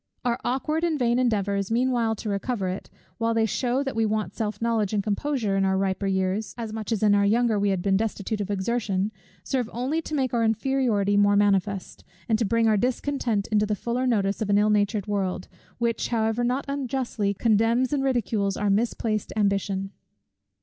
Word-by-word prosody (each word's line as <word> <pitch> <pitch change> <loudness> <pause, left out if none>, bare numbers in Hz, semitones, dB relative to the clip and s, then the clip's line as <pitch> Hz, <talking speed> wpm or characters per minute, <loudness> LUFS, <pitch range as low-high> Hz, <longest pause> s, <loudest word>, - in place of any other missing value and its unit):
Our 240 0 +1
aukward 305 +6 -1
and 335 -3 +1
vain 240 -2 +2
endeavours 200 -5 0
meanwhile 235 -1 +1
to 215 - -5
recover 200 -1 -2
it, 185 - -6 0.3
while 230 0 +1
they 225 -1 +3
shew 250 +4 0
that 270 -3 -4
we 225 - +2
want 215 0 -1
self 215 -2 -3
knowledge 225 -3 0
and 205 -1 +1
composure 215 0 -1
in 195 - +2
our 190 0 +2
riper 195 0 -1
years, 190 +2 -1
as 225 -2 -5
much 220 +1 -5
as 220 -2 0
in 210 -1 +5
our 200 0 +4
younger 220 +1 +2
we 200 0 +2
had 190 -2 -1
been 195 -1 +3
destitute 215 0 -2
of 205 - -4
exertion, 205 -1 -1 0.3
serve 245 +4 -1
only 265 +7 -1
to 310 - -5
make 260 -3 0
our 235 -1 +2
inferiority 225 -3 +1
more 205 0 +4
manifest, 200 -1 0 0.2
and 220 -2 +2
to 230 - +1
bring 230 +2 +2
our 215 -1 +4
discontent 245 -2 -1
into 210 0 +2
the 210 - 0
fuller 240 +5 -2
notice 205 -4 +1
of 215 - -1
an 200 - +4
ill 210 +1 +3
natured 205 -1 +1
world, 190 -3 -2 0.3
which 235 -1 0
however 225 0 0
not 250 +3 0
unjustly 255 -7 -2
condemns 230 +5 +2
and 275 -2 +1
ridicules 220 -6 0
our 205 -1 +1
misplaced 215 0 0
ambition. 195 -2 0
220 Hz, 195 wpm, -25 LUFS, 200-240 Hz, 0.3 s, in